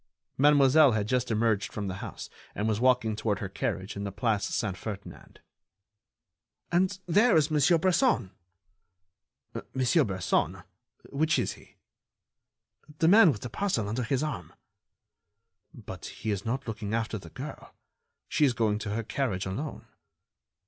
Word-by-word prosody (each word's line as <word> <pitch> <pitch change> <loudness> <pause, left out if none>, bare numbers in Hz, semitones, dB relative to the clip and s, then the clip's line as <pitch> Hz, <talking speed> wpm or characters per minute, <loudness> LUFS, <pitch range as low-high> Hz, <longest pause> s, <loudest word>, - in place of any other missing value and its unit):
Mademoiselle 145 -1 +5
had 105 -1 -1
just 125 +1 0
emerged 110 -1 +1
from 105 -2 -4
the 95 0 -4
house - - -7 0.3
and 105 - -1
was 110 -1 0
walking 125 -3 +2
toward 105 -2 -1
her 100 - -4
carriage 95 -2 -3
in 100 - -4
the 100 - -4
Place 105 +1 0
Saint 100 -4 -2
Ferdinand. 100 0 -9 1.3
"And 185 +2 +2
there 205 +3 +4
is 155 0 +2
Monsieur 155 +3 +4
Bresson." 180 - +2 1.4
"Monsieur 130 +5 +3
Bresson? 95 -3 -1 0.5
Which 155 +3 +1
is - - 0
he?" - - -18 1.2
"The 160 - +2
man 195 -2 +7
with 110 - -6
the 120 - -5
parcel 180 - -1
under 110 +5 -2
his 125 +4 0
arm." 130 -13 -5 1.2
"But - - -9
he 110 - -4
is 100 0 -3
not 130 +3 -3
looking 110 -1 -3
after 115 -1 -2
the 85 - -12
girl. - - -9 0.5
She - - +1
is 135 -4 +4
going 110 -2 0
to 105 -1 -4
her 115 - -2
carriage 110 -4 -2
alone." 110 +11 -5
115 Hz, 150 wpm, -28 LUFS, 105-145 Hz, 1.4 s, man